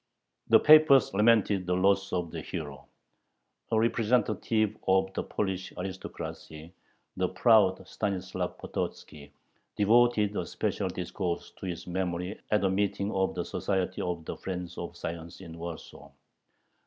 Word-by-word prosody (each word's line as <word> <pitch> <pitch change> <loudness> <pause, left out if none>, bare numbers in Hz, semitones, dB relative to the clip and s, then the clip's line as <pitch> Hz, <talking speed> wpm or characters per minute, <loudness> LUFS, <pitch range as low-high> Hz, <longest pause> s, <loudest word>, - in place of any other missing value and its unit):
The 115 - +8
papers 150 -5 +7
lamented 105 -3 +3
the 90 - +1
loss 100 +1 +2
of 90 -3 -2
the - - -5
hero. - - -7 0.8
A 110 - +3
representative 110 -2 +1
of 95 0 +2
the - - -1
Polish 95 -2 -3
aristocracy, 90 -3 -7 0.4
the 90 -1 +1
proud 95 -5 +3
Stanislav 100 -4 -3
Pototzki, 75 -1 -6 0.5
devoted 110 -1 +3
a - - -2
special - - -2
discourse 85 -2 -4
to 95 - -8
his 85 -2 -5
memory 90 +1 -3
at 105 -1 +2
a 95 - +3
meeting 100 +1 0
of 95 -2 0
the - - -2
"Society 95 -2 -2
of 85 -2 -3
the - - -5
Friends 90 -2 -5
of 85 0 -7
Science" 85 0 -6
in 85 -3 -10
Warsaw. 85 -1 -8
95 Hz, 135 wpm, -29 LUFS, 90-105 Hz, 0.8 s, The